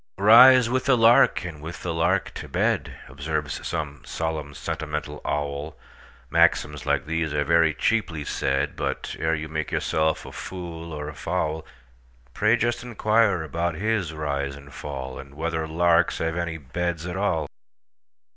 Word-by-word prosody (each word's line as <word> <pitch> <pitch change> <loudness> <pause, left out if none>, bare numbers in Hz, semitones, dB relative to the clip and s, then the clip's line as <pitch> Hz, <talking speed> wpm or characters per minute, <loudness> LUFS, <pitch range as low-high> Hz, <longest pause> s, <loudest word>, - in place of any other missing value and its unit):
"Rise 120 +5 +8
with 130 +2 -1
the 135 -3 +4
lark, 115 -5 +5
and 80 -4 -7
with 80 +3 -8
the 85 - -2
lark 80 +1 +1
to - - -7
bed,"Observes 75 +1 -2
some 75 -4 -4
solemn, 80 -3 -4
sentimental 75 0 -4
owl; 75 +1 -3 0.5
Maxims 75 -1 +2
like - - +1
these 80 -1 -2
are 75 - +2
very 85 +1 +4
cheaply 85 -7 0
said; 70 0 -1
But, - - -3
ere 80 0 +1
you 80 0 -5
make 80 0 -3
yourself 80 0 0
a - - -9
fool 85 -3 -7
or 75 0 -5
fowl, 80 -1 -2 0.7
Pray 110 +2 +3
just 120 +1 0
inquire 110 -5 +2
about 85 +2 -2
his 100 -2 -1
rise 70 -3 -3
and 70 -1 -13
fall, 65 -3 -6
And 70 0 -11
whether 80 0 -2
larks 85 +1 +3
have 80 0 -1
any 85 -2 -2
beds 85 +3 -3
at 90 0 -4
all! 95 -6 0
80 Hz, 150 wpm, -25 LUFS, 75-90 Hz, 0.7 s, Rise